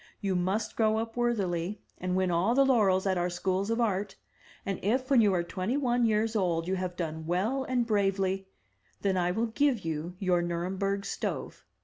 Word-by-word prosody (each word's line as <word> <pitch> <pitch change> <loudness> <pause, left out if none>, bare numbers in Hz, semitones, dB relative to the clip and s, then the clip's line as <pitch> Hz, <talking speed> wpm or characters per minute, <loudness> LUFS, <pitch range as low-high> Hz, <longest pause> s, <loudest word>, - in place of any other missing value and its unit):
You 195 -3 -1
must 195 +5 -1
grow 220 -1 +2
up 225 0 -3
worthily, 200 -6 -1 0.2
and 180 0 -1
win 185 -1 +1
all 180 +8 +2
the 275 +1 +5
laurels 205 -8 +3
at 190 -2 +1
our 175 +1 0
Schools 185 +3 -1
of 230 +1 0
Art, 200 -3 0 0.5
and 195 -2 -2
if 255 +7 0
when 255 -4 +6
you 210 -2 +4
are 175 - +1
twenty 185 +8 -2
one 245 -4 +2
years 220 +1 +1
old 170 -5 0
you 190 - 0
have 185 -1 -3
done 160 -2 -4
well 215 +10 0
and 250 -2 0
bravely, 195 -3 0 0.5
then 195 -1 +1
I 175 -1 +1
will 220 +6 0
give 240 -3 +1
you 165 +2 -3
your 180 -2 +1
Nuremberg 190 +4 -2
stove. - - -4
195 Hz, 195 wpm, -29 LUFS, 180-225 Hz, 0.5 s, when